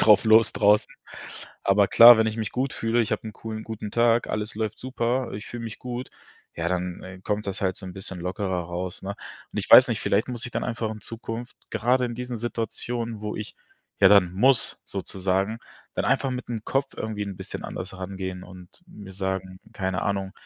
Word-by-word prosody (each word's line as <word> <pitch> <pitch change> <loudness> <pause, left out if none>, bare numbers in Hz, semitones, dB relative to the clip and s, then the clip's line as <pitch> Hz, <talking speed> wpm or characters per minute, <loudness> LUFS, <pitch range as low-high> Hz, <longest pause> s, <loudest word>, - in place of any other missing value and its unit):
drauf 105 0 +6
los 110 0 +6
draußen. 105 +1 +3 0.7
Aber 100 +1 +4
klar, 115 +2 +9
wenn 110 - +3
ich 110 0 -2
mich 110 -2 -2
gut 130 +2 -1
fühle, 115 +1 +1
ich 115 - 0
habe - - -1
'n - - -8
coolen 110 0 -6
guten 110 -2 -6
Tag, 115 0 +3
alles 105 0 -3
läuft 110 -1 -2
super, 125 -1 -1
ich 105 - -7
fühle 120 -1 -7
mich 115 +1 -7
gut, 125 +1 -6 0.5
ja, 85 0 -1
dann, 90 0 -2
äh, 95 0 -10
kommt 105 +1 -2
das 100 +1 -4
halt 95 -3 0
so 95 - -9
'n 90 - -7
bisschen 95 -1 -7
lockerer 90 0 -2
raus, 90 +1 -5
ne? 100 +1 -4 0.4
Und - - -4
ich - - -4
weiß - - +11
nicht, - - -1
vielleicht 100 +2 +1
muss 120 0 -5
ich 125 - -6
dann - - -2
einfach 115 -2 -2
in 110 -1 -7
Zukunft, 115 +2 -6 0.2
gerade 125 +2 +2
in 120 - -3
diesen 125 -1 -4
Situationen, 115 0 -3
wo 105 0 -4
ich, 105 - -6 0.5
ja 100 - +8
dann 95 -3 +5
muss 125 +6 +2
sozusagen, 95 +3 -2 0.4
dann - - -1
einfach 135 +1 +2
mit 125 -1 -5
dem 115 -3 -4
Kopf 135 0 -1
irgendwie 110 -1 -3
'n 100 -2 -6
bisschen - - -6
anders - - -6
rangehen 95 0 -5
und 90 -1 -12 0.2
mir 105 - -11
sagen 95 -1 -4
keine 95 -1 -2
Ahnung, 95 -1 -1
105 Hz, 210 wpm, -25 LUFS, 95-115 Hz, 0.7 s, weiß